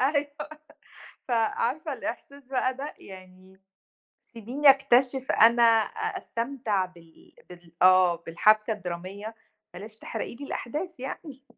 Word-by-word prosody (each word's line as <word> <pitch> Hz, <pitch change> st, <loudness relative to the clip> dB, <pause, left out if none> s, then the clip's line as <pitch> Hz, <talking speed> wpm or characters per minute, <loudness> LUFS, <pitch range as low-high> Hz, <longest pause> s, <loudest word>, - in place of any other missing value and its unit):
أيوه. 285 Hz, +1 st, -2 dB, 0.8 s
ف -, -, -7 dB
عارفة 245 Hz, +7 st, 0 dB
الإحساس 280 Hz, -1 st, -7 dB
بقى 255 Hz, 0 st, 0 dB
ده؟ 275 Hz, +3 st, -7 dB
يعني 185 Hz, 0 st, -15 dB, 0.7 s
سيبيني 260 Hz, +6 st, +4 dB
أكتشف 265 Hz, 0 st, +2 dB
أنا 235 Hz, +2 st, +5 dB, 0.6 s
أستمتع 230 Hz, -, -2 dB
بال 170 Hz, -3 st, -20 dB, 0.2 s
بال 175 Hz, -2 st, -14 dB
آه، 185 Hz, -1 st, +6 dB
بالحبكة 215 Hz, +7 st, +2 dB
الدرامية، 195 Hz, +3 st, -6 dB, 0.4 s
بلاش 215 Hz, +4 st, -10 dB
تحرقي -, -, -5 dB
لي 280 Hz, +4 st, -9 dB
الأحداث 300 Hz, +5 st, -5 dB
يعني. 270 Hz, +1 st, -8 dB
230 Hz, 110 wpm, -27 LUFS, 185-270 Hz, 0.8 s, آه